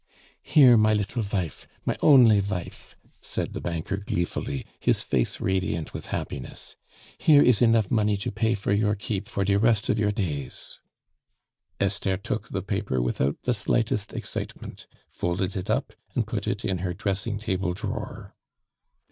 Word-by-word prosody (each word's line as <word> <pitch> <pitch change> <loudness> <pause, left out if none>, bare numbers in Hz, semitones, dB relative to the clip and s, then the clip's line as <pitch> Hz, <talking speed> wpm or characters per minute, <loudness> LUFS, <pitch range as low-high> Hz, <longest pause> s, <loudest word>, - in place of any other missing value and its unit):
"Here, 130 -6 +6
my 110 0 +4
little 105 +3 -1
vife, 95 -6 -3 0.2
my - - 0
only 120 -8 +7
vife," 95 -3 -5 0.3
said - - -3
the - - -5
banker 85 +3 -3
gleefully, 85 -8 -3
his - - +2
face 60 - 0
radiant 95 -4 -1
with - - -6
happiness. 65 - -5 0.4
"Here 145 -2 +6
is 125 -3 +4
enough 115 -4 +4
money 105 -2 +2
to 100 - -3
pay 110 +2 +1
for 100 0 -1
your 105 0 +2
keep 100 -1 -4
for 100 - -1
de 100 +1 +3
rest 110 -1 +3
of 105 - +2
your 105 -1 +2
days." 75 - -4 1.0
Esther 95 -1 0
took 100 - -4
the - - -3
paper 65 - -1
without 65 +3 -1
the 125 - +1
slightest 110 -1 0
excitement, - - -6 0.2
folded 90 +1 -2
it 95 - -4
up, - - 0 0.2
and - - +1
put - - -4
it - - -2
in 95 -2 -1
her 90 0 -2
dressing 100 +3 -2
table 95 -4 -1
drawer. - - -6
100 Hz, 155 wpm, -26 LUFS, 90-110 Hz, 1.0 s, only